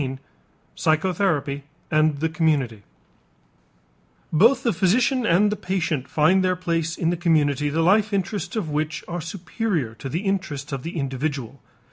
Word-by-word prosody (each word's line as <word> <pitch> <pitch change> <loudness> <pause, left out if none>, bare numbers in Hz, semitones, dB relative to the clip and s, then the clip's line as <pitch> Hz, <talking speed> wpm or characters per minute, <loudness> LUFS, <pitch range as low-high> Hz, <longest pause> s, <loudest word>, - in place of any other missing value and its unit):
XIV 135 -1 -3 0.6
PSYCHOTHERAPY 160 -4 0 0.3
AND 155 -2 +2
THE 160 - +1
COMMUNITY 150 -9 0 1.5
Both 230 - +5
the 235 -4 +2
physician 240 +6 +2
and 205 +4 +4
the - - 0
patient 175 -8 -2
find 165 +5 +3
their 185 0 +2
place 165 -2 -2
in 165 0 +1
the - - 0
community 150 -4 +2
the 160 +3 0
life 210 +4 +3
interests 200 +4 -2
of 185 -9 -2
which 155 +1 -2
are 175 -1 -4
superior 175 - -3
to 135 +4 -7
the 165 +7 -2
interests 170 -9 -2
of 135 -2 -3
the 165 +4 -6
individual. 135 -2 -3
165 Hz, 150 wpm, -23 LUFS, 145-190 Hz, 1.5 s, Both